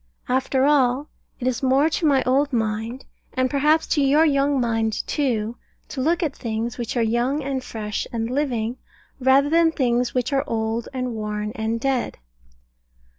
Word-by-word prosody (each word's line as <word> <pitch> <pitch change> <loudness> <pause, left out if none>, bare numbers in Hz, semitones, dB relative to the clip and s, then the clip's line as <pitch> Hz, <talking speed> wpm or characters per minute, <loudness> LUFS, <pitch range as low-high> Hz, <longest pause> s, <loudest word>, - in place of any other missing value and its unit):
After 260 +1 +1
all, 280 -1 +2 0.3
it 250 - -4
is 255 -2 -1
more 270 +3 +3
to 325 0 0
my 275 -2 +3
old 275 +3 +2
mind, 225 +1 -2 0.3
and 255 0 0
perhaps 300 +3 +3
to 295 - +2
your 285 +4 +4
young 280 -2 +2
mind 225 -2 0
too, 235 -5 -1 0.3
to 265 - -4
look 335 +6 +1
at 295 -4 -2
things 230 +1 -4
which 240 +1 -3
are 235 - +3
young 240 +6 0
and 265 -1 -3
fresh 210 -3 -4
and 225 -1 -2
living, 250 -3 -1 0.4
rather 265 +2 +4
than 330 0 +4
things 245 -4 0
which 250 +2 0
are 270 - +2
old 225 +1 -2
and 255 -2 -3
worn 210 -1 -3
and 220 +1 -2
dead. 265 -1 -1
255 Hz, 170 wpm, -23 LUFS, 230-280 Hz, 0.4 s, your